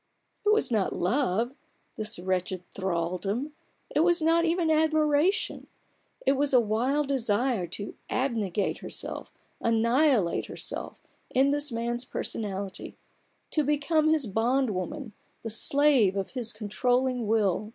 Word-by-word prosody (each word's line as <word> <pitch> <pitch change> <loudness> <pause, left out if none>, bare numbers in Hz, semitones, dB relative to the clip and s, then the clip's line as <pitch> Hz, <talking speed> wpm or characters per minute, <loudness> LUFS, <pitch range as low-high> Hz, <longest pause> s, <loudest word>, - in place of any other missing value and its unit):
It 415 - +2
was 425 - +2
not 210 -4 +1
love, 230 +4 0 0.4
this 215 +1 -2
wretched 185 0 -2
thraldom, 190 - -2 0.4
it - - +1
was 345 +2 +4
not 330 +1 +3
even 335 -1 +1
admiration; 315 +5 +2 0.6
it - - +5
was 280 0 +2
a - - +8
wild 245 +7 +1
desire 235 -5 +1
to 200 +4 -6 0.2
abnegate 220 -7 -1
herself, - - -6 0.3
annihilate 230 - +2
herself, - - -6 0.3
in 270 +2 +3
this 290 -1 0
man's 235 +1 -2
personality; 200 -6 -5 0.6
to 305 - +2
become 300 +2 +2
his 315 -4 +3
bond 235 +4 +1
woman, 220 +6 -4 0.3
the 225 - -4
slave 255 -5 +3
of 195 - -3
his 240 -3 -1
controlling 245 +3 0
will. 210 -1 +1
240 Hz, 125 wpm, -28 LUFS, 205-290 Hz, 0.6 s, a